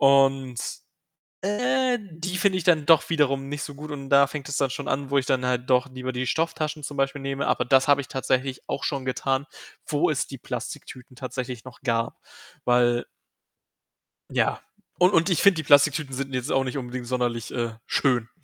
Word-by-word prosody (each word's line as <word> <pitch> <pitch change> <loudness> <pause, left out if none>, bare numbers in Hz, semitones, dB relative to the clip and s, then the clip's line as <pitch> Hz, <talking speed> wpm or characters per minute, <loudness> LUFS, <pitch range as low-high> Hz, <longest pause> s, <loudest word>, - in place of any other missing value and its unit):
Und, 135 -2 +4 0.9
äh, 250 +5 +1
die 180 -1 -5
finde 190 0 +3
ich 170 - -5
dann 160 -5 +3
doch 165 0 +5
wiederum 140 -4 +1
nicht 145 0 -4
so 145 - -6
gut 150 +2 -9
und 140 -2 -6
da 140 0 +6
fängt 140 0 -6
es 145 - -3
dann 135 -2 +1
schon 140 - -5
an, 135 0 -1
wo 140 - +3
ich 130 - 0
dann 130 -1 +1
halt 125 0 -1
doch 125 +1 +3
lieber 130 0 -4
die 125 +1 -2
Stofftaschen 155 0 -1
zum 145 0 -6
Beispiel 135 +1 0
nehme. 135 +1 -2
Aber - - +1
das 135 +2 +4
habe 140 0 +5
tatsächlich 130 0 -1
auch - - -3
schon 140 -3 -2
getan, 135 +2 -1 0.4
wo 145 -1 +1
es 150 - 0
die 135 - -9
Plastiktüten 125 +1 -7
tatsächlich 125 -2 -5
noch 130 -1 -12
gab, 115 -2 -1 0.4
weil 120 -1 +3 1.3
ja. - - +1 0.4
Und 180 +2 +5
und 165 +4 +4
ich 175 - +2
finde, 200 -4 +6
die 155 - -2
Plastiktüten 145 -1 +4
sind 135 +1 -4
jetzt 125 -1 -2
auch 135 - +3
nicht 130 +1 -3
unbedingt 125 -1 -5
sonderlich, 120 -2 -2
äh, 115 -2 -2
schön. 125 -5 +1
135 Hz, 190 wpm, -25 LUFS, 130-150 Hz, 1.3 s, da